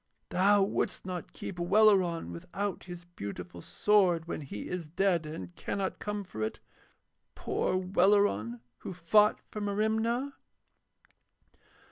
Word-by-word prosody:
Thou 200 +2 +4
wouldst 195 - -1
not 180 -2 -5
keep 180 - -7
Welleran 185 - +4
without 190 - -4
his 175 -1 -9
beautiful 100 - -7
sword 175 - +3
when 170 - -4
he 135 -7 -6
is 180 -3 -4
dead 175 -2 +1
and 90 - -7
cannot 195 - -3
come 210 -1 -3
for 110 - -8
it, 110 - -2 0.8
poor 185 - 0
Welleran 185 - +2 0.2
who - - -6
fought 210 +5 +4
for 210 - -5
Merimna.' 220 +6 0
185 Hz, 120 wpm, -30 LUFS, 160-205 Hz, 0.8 s, Thou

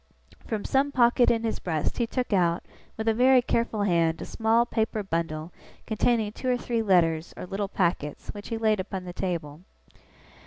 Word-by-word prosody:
From 215 -3 -3
some 275 +1 +2
pocket 245 -1 +4
in 230 -1 +1
his 225 - -2
breast, 160 -4 -2
he 235 - +1
took 250 -2 -2
out, 175 -3 +2 0.3
with 220 0 -4
a 225 - +4
very 255 +3 +5
careful 230 -3 0
hand 170 -4 +2
a - - -5
small 225 +1 +2
paper 220 -2 -1
bundle 165 -2 -3 0.3
containing 220 -1 +1
two 255 +4 -4
or 250 - +2
three 235 -1 -1
letters 170 -5 +2
or - - -6
little 195 +2 -3
packets, 170 -7 -1
which 205 -1 -7
he 225 - -3
laid 215 -2 +2
upon 190 0 -4
the 180 -1 -7
table. 170 -5 -4
210 Hz, 185 wpm, -26 LUFS, 175-230 Hz, 0.3 s, very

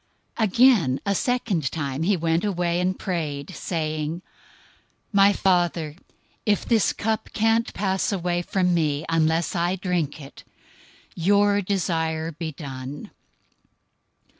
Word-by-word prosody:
026:042 - - +3
Again, 195 - +4
a 200 - +2
second 200 - 0
time 140 -3 -3
he 190 +3 +2
went 165 +1 0
away, 175 -4 0
and 185 +1 0
prayed, 155 -5 -3
saying, 155 0 -3 0.9
"My 200 0 +6
Father, 175 -6 +1 0.5
if 205 -2 +1
this 225 -3 +3
cup 220 +1 -2
can't 225 +1 +2
pass 190 0 0
away 175 -2 -1
from 180 0 +1
me 155 -3 0
unless 165 +1 +1
I 175 +2 +1
drink 175 -6 -2
it, 140 -2 -12 0.7
your 205 +3 +3
desire 165 -4 -1
be 160 0 -5
done." 135 -1 -8
175 Hz, 120 wpm, -24 LUFS, 155-195 Hz, 0.9 s, My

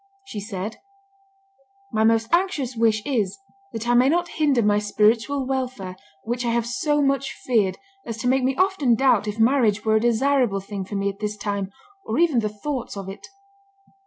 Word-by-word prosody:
She 220 - -6
said, 205 +1 -5 1.1
"My 220 -2 +1
most 225 +2 +2
anxious 340 -9 +1
wish 220 -2 +2
is, 220 -9 -1 0.3
that 225 +1 -5
I 240 - +3
may 250 +2 +5
not 345 +2 +1
hinder 285 -8 +2
my 205 0 +3
spiritual 220 +6 +1
welfare, 255 -8 -3 0.3
which 240 +2 -2
I 240 - 0
have 235 0 +1
so 295 +3 0
much 275 0 0
feared 215 -7 0 0.3
as 230 -1 -6
to 230 - -3
make 260 +1 +2
me 260 +1 +1
often 370 -10 +2
doubt 230 -4 +3
if 210 +1 -3
marriage 225 -3 +3
were 220 0 +4
a - - 0
desirable 240 -2 +2
thing 195 0 -6
for 205 - -7
me 200 0 0
at 200 - -8
this 210 0 -3
time, 200 -1 -3 0.3
or 220 - -3
even 320 -7 +3
the 215 -2 -1
thoughts 235 +2 -5
of 195 -1 -6
it." 195 - -9
230 Hz, 190 wpm, -23 LUFS, 210-265 Hz, 1.1 s, may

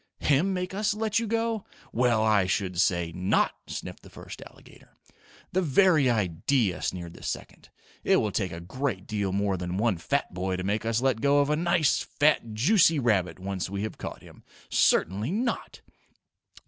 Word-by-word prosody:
Him 150 +7 +2
make 180 0 -3
us 205 +1 0
let 220 0 0
you 230 - -3
go? 225 -1 -1 0.3
Well, 120 -2 +2
I 105 -4 +3
should 95 -2 0
say 85 -4 +1
NOT!" 90 +4 +1 0.2
sniffed - - -7
the - - -15
first - - -11
alligator. - - -20 0.5
"The 185 - +1
very 155 -3 +4
idea" 105 - 0
sneered 85 -2 -4
the - - -14
second. - - -6 0.3
"It - - +4
will 105 - 0
take 95 -3 -2
a 85 - -6
great 95 +2 -4
deal 100 -3 -2
more 100 0 0
than 90 +1 -4
one 105 -4 +1
fat 140 +7 -1
boy 95 +1 -2
to 90 - -4
make 105 +3 -1
us 115 +1 +1
let 130 -4 +1
go 140 0 +3
of 145 +1 +2
a - - +3
nice, 170 -2 +2
fat, 145 -7 +1
juicy 165 - +4
rabbit 100 - +1
once 95 -1 -4
we 100 +1 -3
have 110 - -6
caught - - -7
him. - - -16 0.3
Certainly 100 - +2
NOT!" 235 +3 -3
110 Hz, 180 wpm, -27 LUFS, 95-150 Hz, 0.5 s, very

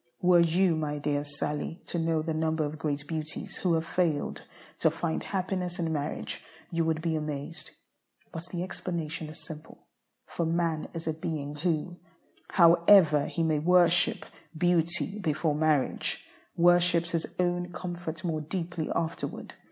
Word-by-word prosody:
Were 180 -1 +5
you, 170 +1 +3
my 150 -1 -2
dear 145 0 -1
Sallie, 145 +3 -3
to 170 - -3
know 165 -1 +1
the 160 0 -2
number 160 0 0
of 150 +1 -5
great 150 -2 -2
beauties 155 -1 -5
who 175 -3 +2
have 160 0 -1
failed 165 -4 0 0.4
to - - +4
find 80 -1 -2
happiness 185 - -2
in 165 -2 -1
marriage, 145 0 -3 0.3
you 165 -1 +1
would 160 -1 0
be 165 -2 0
amazed. 150 +1 -4 0.6
But 165 0 -7
the 175 -1 -3
explanation 165 -4 -4
is 155 - -10
simple; 155 0 -11 0.4
for 170 - -3
man 165 -1 0
is 165 - -5
a 160 - +1
being 155 -3 -4
who, 165 +2 -1 0.5
however 170 -3 +6
he 170 - -1
may 155 -2 +2
worship 175 +1 +4 0.3
beauty 175 +2 +1
before 155 -3 0
marriage, 150 -2 +1 0.3
worships 175 0 +4
his 165 -1 -1
own 175 0 0
comfort 170 -2 -5
more 160 -3 -1
deeply 170 0 -4
afterward. 165 0 -3
165 Hz, 150 wpm, -29 LUFS, 155-175 Hz, 0.6 s, however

